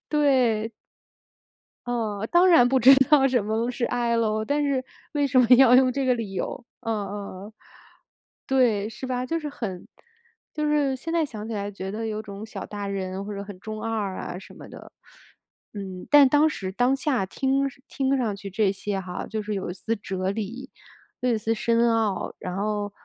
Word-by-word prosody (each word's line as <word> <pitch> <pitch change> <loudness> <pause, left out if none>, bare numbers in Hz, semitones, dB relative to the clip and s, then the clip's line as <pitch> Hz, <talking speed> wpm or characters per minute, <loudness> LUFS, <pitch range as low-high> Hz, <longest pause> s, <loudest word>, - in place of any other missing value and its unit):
对。 255 -7 +2 1.2
呃， 220 -3 -2
当 355 +2 +6
然 325 -9 +7
不 260 +1 +2
知 265 +4 +9 0.2
道 270 -3 +6
什 245 -5 +1
么 225 +3 -1
是 245 -1 -2
爱 235 -1 0
咯， 215 -1 +1
但 290 +5 0
是 275 -2 0 0.3
为 290 -1 +1
什 260 -1 +2
么 250 - +6
要 255 -2 +7
用 255 -1 +4
这 275 0 -1
个 250 - +4
理 225 -5 -5
由？ 195 - -4 0.2
呃 225 - -4
呃 215 - -1 0.4
呃， 210 +2 -10 0.9
对， 235 -6 +2
是 230 +4 -7
吧？ 250 0 -2
就 330 - -1
是 300 -2 -5
很 195 -10 -6 0.7
就 300 -1 -2
是 290 -3 +1
现 330 +6 -6
在 330 -3 +2
想 215 -4 -7
起 230 - -5
来 205 -1 -3
觉 190 -1 -6
得 225 +2 -4
有 215 0 -3
种 200 0 -8
小 - - -7
大 205 -1 -5
人 190 0 -4
或 210 - -5
者 200 - -5
很 200 -2 -10
中 215 +1 -6
二 215 -4 -2
啊 180 - -5
什 190 - -13
么 - - -12
的， - - -12 0.8
嗯， 190 -3 -7
但 290 -2 +8
当 295 +3 +4
时 190 -10 -5
当 245 +7 +2
下 265 - 0
听 270 +5 0 0.2
听 270 0 0
上 230 -6 -1
去 200 0 -8
这 195 0 +1
些 200 0 -3
哈， 180 -1 -6
就 220 -1 -4
是 210 0 -4
有 190 -2 -3
一 - - -5
丝 225 +4 -2
哲 190 -2 -3
理， 225 +6 -5 0.5
又 250 - 0
有 - - +3
一 - - -2
丝 225 +2 0
深 235 +1 +2
奥。 220 -3 -1
然 180 0 -5
后， 205 0 -2
225 Hz, 215 characters per minute, -25 LUFS, 205-265 Hz, 1.2 s, 知